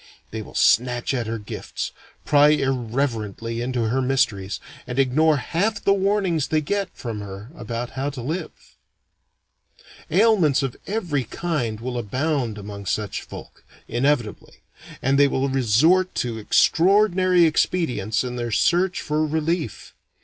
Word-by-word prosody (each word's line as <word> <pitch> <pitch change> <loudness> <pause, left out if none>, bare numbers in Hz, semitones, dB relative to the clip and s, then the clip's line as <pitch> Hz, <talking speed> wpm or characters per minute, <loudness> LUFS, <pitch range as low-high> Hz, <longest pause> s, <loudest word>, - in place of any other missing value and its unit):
They 110 - -4
will - - -12
snatch 125 +2 +2
at 120 -4 -2
her 115 +1 -2
gifts, 105 -2 -6 0.3
pry 145 0 +5
irreverently 120 -5 -1
into 125 -1 -1
her 130 +3 +1
mysteries, 110 -7 0 0.3
and 125 0 -5
ignore 145 +4 +3
half 200 - -1
the 200 - +4
warnings 195 -6 +1
they 155 - +1
get 195 +5 -2
from 115 -5 -5
her 100 +3 -8
about 120 0 -5
how 135 +2 -2
to 135 -3 -7
live. 160 +5 -3 1.6
Ailments 180 -7 +3
of 135 -3 -3
every 175 - -1
kind 125 -5 -3
will 125 +1 -4
abound 125 0 -1
among 100 -1 -8
such 105 0 -2
folk, - - -11 0.2
inevitably, 120 -2 -1 0.4
and 135 +2 +2
they 145 - +6
will 135 0 0
resort 135 - +3
to 115 -2 -2
extraordinary 185 - +4
expedients 130 - 0
in 125 -1 -5
their 120 -1 -3
search 175 - +2
for 150 +1 0
relief. 160 -2 -2
135 Hz, 135 wpm, -23 LUFS, 115-165 Hz, 1.6 s, they